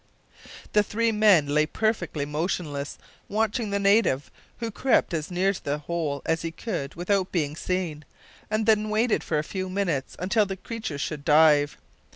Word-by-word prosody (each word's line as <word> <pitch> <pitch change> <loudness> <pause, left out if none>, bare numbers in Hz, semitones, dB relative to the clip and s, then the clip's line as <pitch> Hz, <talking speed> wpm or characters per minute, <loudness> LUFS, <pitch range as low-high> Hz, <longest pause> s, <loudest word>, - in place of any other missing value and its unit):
The 210 - +6
three 225 +3 0
men 210 -8 +5
lay 150 +1 +3
perfectly 215 -8 -1
motionless 150 -2 -3 0.3
watching 220 +1 0
the 200 - 0
native, 200 -8 +2 0.3
who 230 -1 -4
crept 255 -4 +2
as 155 -2 -2
near 190 +2 +1
to - - -9
the 145 +1 -1
hole 150 -2 -3
as 160 0 0
he 165 - -3
could 165 - -5
without 185 +2 0
being 150 -4 -1
seen, 170 -3 -3 0.5
and 215 0 0
then 215 -1 +3
waited 220 +2 +1
for 155 - -1
a 150 - 0
few 185 +3 -4
minutes 180 -8 -2
until 205 +4 +1
the 195 0 -4
creatures 200 -9 -5
should 150 -1 -4
dive. 150 -1 +5
180 Hz, 170 wpm, -26 LUFS, 150-210 Hz, 0.5 s, The